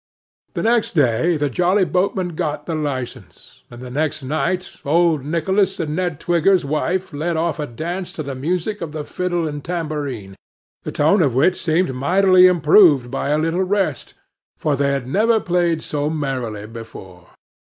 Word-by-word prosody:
The - - -2
next 230 0 +2
day, 155 +3 +2
the 145 0 0
Jolly 180 - +2
Boatmen 185 0 0
got 150 -3 -3
the 165 - -3
licence, 140 -5 -6
and 120 +1 -11
the 125 - -8
next 150 +1 -2
night, 160 +6 -2
old 160 -1 +2
Nicholas 190 +6 0
and 155 -2 -2
Ned 175 -4 -2
Twigger's 175 0 +2
wife 170 +5 -2
led 160 +3 -2
off 165 -1 -1
a 150 - -3
dance 175 +9 -5
to 160 - -5
the 140 -1 -5
music 175 +9 -2
of 160 -3 -5
the 155 -1 -4
fiddle 175 0 -2
and 145 -1 -6
tambourine, 145 - -4 0.5
the - - -6
tone 160 +7 +3
of 135 -7 +1
which 160 +8 +2
seemed 165 -3 +1
mightily 185 +7 +5
improved 155 -6 +5
by - - -2
a 150 - +2
little 165 +3 0
rest, 190 -7 -1 0.4
for 150 -2 0
they 140 0 +1
never 205 - +1
had 220 - 0
played 175 -2 +1
so 145 0 -2
merrily 130 -9 -3
before. 100 -6 -11
160 Hz, 170 wpm, -20 LUFS, 140-180 Hz, 0.5 s, mightily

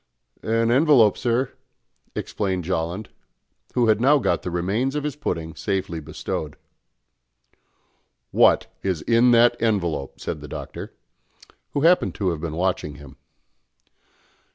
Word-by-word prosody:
"An 115 +1 +1
envelope, 130 -6 +5
sir," 125 +2 0 0.6
explained 95 -3 -2
Jolland, 85 +4 -3 0.7
who 125 - +3
had 110 0 +3
now 145 +4 +5
got 95 -9 0
the - - -4
remains 100 +11 -1
of 150 - -1
his 150 -2 -3
pudding 85 - -3
safely 95 -4 -2
bestowed. 75 0 -5 1.8
"What - - +4 0.2
is 90 -6 -2
in 120 +1 +4
that 120 0 +5
envelope?" 85 -11 -1
said 75 - -5
the 75 - -8
Doctor, - - -8 0.8
who 140 - 0
happened 170 +4 +3
to 95 -3 0
have 80 -2 -5
been 80 -2 -4
watching 90 -4 -1
him. 70 -1 -13
100 Hz, 130 wpm, -23 LUFS, 85-120 Hz, 1.8 s, envelope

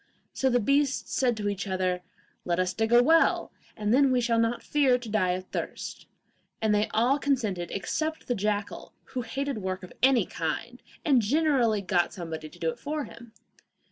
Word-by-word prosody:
So 265 - +1
the 245 -1 +3
beasts 275 +3 +1
said 245 -3 +1
to 205 -1 -2
each 200 0 -2
other, 185 -1 -1 0.4
'Let 175 -1 0
us 185 0 +1
dig 225 +1 -1
a 240 0 +7
well, 325 +4 +3 0.3
and 210 +1 0
then 270 +1 +5
we 250 - +3
shall 230 -1 +1
not 230 +1 0
fear 275 -4 +3
to 245 -2 -9
die 185 -4 +2
of 185 +1 -4
thirst;' - - -5 0.5
and 220 -1 +2
they 210 +1 +2
all 245 +6 +2
consented 220 -12 -1
except 315 +10 -3
the 245 - +1
jackal, 210 -1 -3 0.2
who 255 - -1
hated 270 +1 -3
work 185 -1 -4
of 180 - -10
any 260 -1 +5
kind, - - -4 0.2
and 270 -5 +5
generally 245 -4 +2
got 175 -3 +1
somebody 160 -4 -6
to - - -16
do 165 -1 0
it - - -12
for 300 +1 -3
him. 235 -3 -12
230 Hz, 190 wpm, -27 LUFS, 195-265 Hz, 0.5 s, a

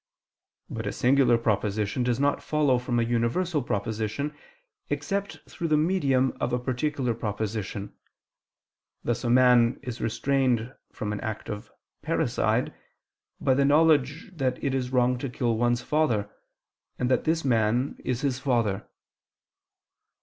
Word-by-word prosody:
But - - -5
a - - -1
singular 130 -1 +3
proposition 105 0 0
does 120 0 0
not 145 0 +1
follow 145 -5 +2
from 125 -1 -1
a - - +2
universal 120 +8 0
proposition, 110 +6 -2 0.6
except 200 0 -2
through 170 - -4
the 155 -1 +3
medium 140 -6 +2
of 120 - 0
a 125 - +1
particular 130 0 -1
proposition: 105 -2 -4 1.1
thus 120 +1 -1
a 120 - 0
man 125 -1 +5
is 125 -2 -6
restrained 125 0 0 0.2
from 105 -1 -4
an 105 - -4
act 110 -1 -5
of 105 0 -7 0.3
parricide, - - 0 0.7
by 130 - +2
the 140 +2 +3
knowledge 150 - +3
that 130 -4 0
it 140 - 0
is 130 -2 -1
wrong 125 -1 +2
to 140 - -3
kill 120 -1 0
one's 120 +1 +1
father, 120 -10 0 0.7
and 125 - 0
that - - +2
this 160 -1 +1
man 120 +2 +1
is 125 -1 -2
his 135 -3 -1
father. 115 -7 0
125 Hz, 140 wpm, -26 LUFS, 115-140 Hz, 1.1 s, man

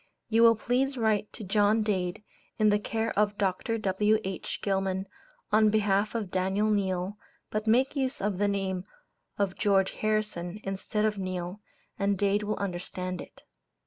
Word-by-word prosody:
You 225 0 +4
will 230 0 +7
please 255 +5 0
write 215 -3 +1
to 225 - -6
John 210 +2 +3
Dade, 185 -2 -1 0.3
in 215 -1 +4
the 205 - +3
care 225 +2 -2
of 210 0 +1
Doct. 200 +4 0
W.H. 195 0 0
Gilman, 190 -1 0 0.5
on 215 0 +5
behalf 210 0 +1
of 210 -5 -2
Daniel 190 +3 +1
Neale, 195 0 -1 0.3
but 215 +1 -2
make 255 +6 +3
use 265 -1 0
of 195 -2 -1
the 205 - +3
name 190 -2 -1 0.5
of 200 -2 0
George 195 -2 +2
Harrison, 215 -4 -2
instead 195 +2 -1
of 210 -2 0
Neale, 185 +1 -4 0.4
and 200 0 +1
Dade 200 +1 +2
will 210 0 -2
understand 185 -1 -4
it. - - -13
205 Hz, 155 wpm, -28 LUFS, 190-215 Hz, 0.5 s, will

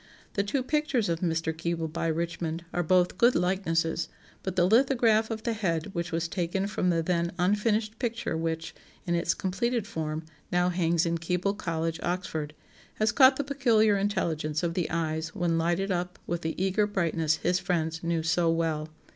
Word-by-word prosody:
The 200 - +1
two 235 +7 -1
pictures 290 - 0
of 165 -1 0
Mr. 165 -2 0
Keble 165 0 -2
by 165 - -1
Richmond 165 0 -2
are 175 - +1
both 180 +2 +2
good 240 +1 +5
likenesses; 170 -2 0 0.3
but 190 -1 -4
the 175 - +4
lithograph 225 0 +4
of 220 -1 -4
the 235 - 0
head 185 -4 -1
which 170 -1 -3
was 165 0 -1
taken 180 +2 -1
from 200 -3 0
the 165 -2 +1
then 170 0 0
unfinished 210 +4 +1
picture 230 -8 -2
which, 160 0 -2 0.3
in 175 - 0
its 170 0 +1
completed 235 +4 -1
form, 155 -3 -4 0.3
now 180 0 +3
hangs 170 -2 +1
in 170 0 0
Keble 180 +3 0
College, 165 -3 -2
Oxford, 160 -4 -3 0.4
has 215 0 +2
caught 265 +1 +7
the 285 - -1
peculiar 235 -7 +3
intelligence 170 -6 -1
of 170 -1 0
the 175 -1 -1
eyes 160 0 -2
when 170 -2 +1
lighted 175 +4 0
up 180 0 -2
with 170 0 -2
the 160 -1 -2
eager 195 +3 +2
brightness 165 -5 +1
his 180 +3 0
friends 165 -3 -1
knew 170 -1 0
so 165 +1 +2
well. 160 -2 0
175 Hz, 180 wpm, -28 LUFS, 165-205 Hz, 0.4 s, caught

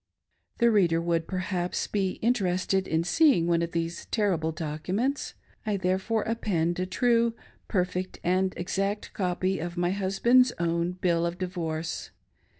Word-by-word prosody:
The 235 -1 +4
reader 175 -6 +3
would, 170 -1 0
perhaps, 185 -1 -2
be 195 -3 -1
interested 190 -4 +1
in 160 +1 +1
seeing 260 - +4
one 170 -1 +2
of 170 0 -2
these 170 0 -3
terrible 180 -8 0
documents. 175 - -2 0.3
I 210 -2 0
therefore 190 +4 0
append 180 -7 -1
a 185 - -1
true, 235 +3 +2 0.3
perfect, 185 -1 -1
and 185 +2 +2
exact 195 +3 -2
copy 185 0 -1
of 175 +2 -5
my 175 0 +1
husband's 235 +6 +3
own 170 +1 0
bill 175 -2 +1
of 170 +1 -2
di 185 - -2
vorce. 165 -3 -4
185 Hz, 145 wpm, -27 LUFS, 170-205 Hz, 0.3 s, The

